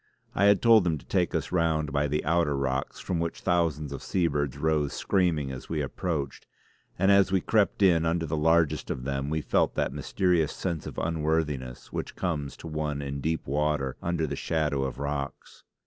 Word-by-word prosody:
I 100 - +2
had 100 -1 +5
told 115 -5 +6
him 80 -2 +1
to - - -14
take - - 0
us - - -2
round 80 -4 +1
by 75 0 +2
the 75 +2 -1
outer 80 -3 +2
rocks 70 0 -2
from 90 -3 -2
which 85 0 -3
thousands 80 -5 0
of 70 - -6
seabirds 75 -6 0
rose 75 -1 +1
screaming 85 -8 +1
as 65 - -8
we 80 - -1
approached; 75 0 -3 0.5
and 95 +2 +4
as 100 -1 +5
we 95 - +3
crept 105 +1 +1
in 85 -4 +5
under 80 0 0
the 80 0 -2
largest 80 0 +2
of 65 - -3
them 70 +1 -2
we 80 +1 -1
felt - - +1
that - - 0
mysterious 90 -5 +1
sense 85 -5 -3
of - - -8
unworthiness 75 -6 -2
which - - -4
comes 75 -6 -3
to - - -9
one 75 -2 -2
in 70 0 -4
deep 80 +2 -1
water 75 -1 0
under 85 -2 0
the 70 -2 -3
shadow 75 -3 0
of 65 - -4
rocks. 70 -1 -5
75 Hz, 195 wpm, -27 LUFS, 70-85 Hz, 0.5 s, told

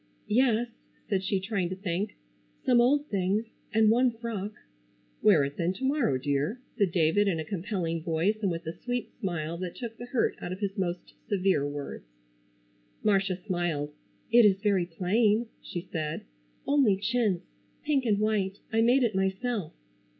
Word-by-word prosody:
"Yes," 240 0 +3 0.4
said 195 -3 0
she, 195 0 0
trying 190 -2 -1
to 185 - -3
think. 190 +2 -3 0.5
"Some 245 -2 +5
old 285 +4 +3
things, 200 +3 +1 0.3
and 220 0 +5
one 250 +2 +4
frock." 225 -3 -5 0.7
"Wear 180 -9 +6
it 140 +1 -4
then 175 +1 +1
to 260 - -9
morrow, 265 - +2
dear," 145 - -1 0.2
said 200 -5 +2
David, 175 +4 +3
in 175 -5 +1
a 160 - -3
compelling 175 -3 -2
voice 170 +7 0
and 200 - +2
with 170 -1 -3
the 160 -1 -4
sweet 245 +5 -4
smile 170 -6 -2
that 180 -2 -4
took 230 -3 -6
the 240 - -8
hurt 245 -1 +1
out 175 - -4
of 185 - -5
his 200 -2 -2
most 180 -2 -3 0.2
severe 185 -7 +2
words. 145 - -6 1.0
Marcia 195 -2 +2
smiled. 170 -6 -1 0.4
"It 240 0 +8
is 195 -2 +5
very 195 -4 +2
plain," 210 +6 +2 0.2
she 175 - -5
said, 155 -2 -3 0.4
"only 275 -9 +4
chintz, 205 -4 0 0.4
pink 290 -3 +2
and 215 -4 +2
white. 205 -2 0 0.2
I 225 - +4
made 245 +3 +4
it 230 -3 +1
myself." 190 0 -1
195 Hz, 165 wpm, -28 LUFS, 175-225 Hz, 1.0 s, It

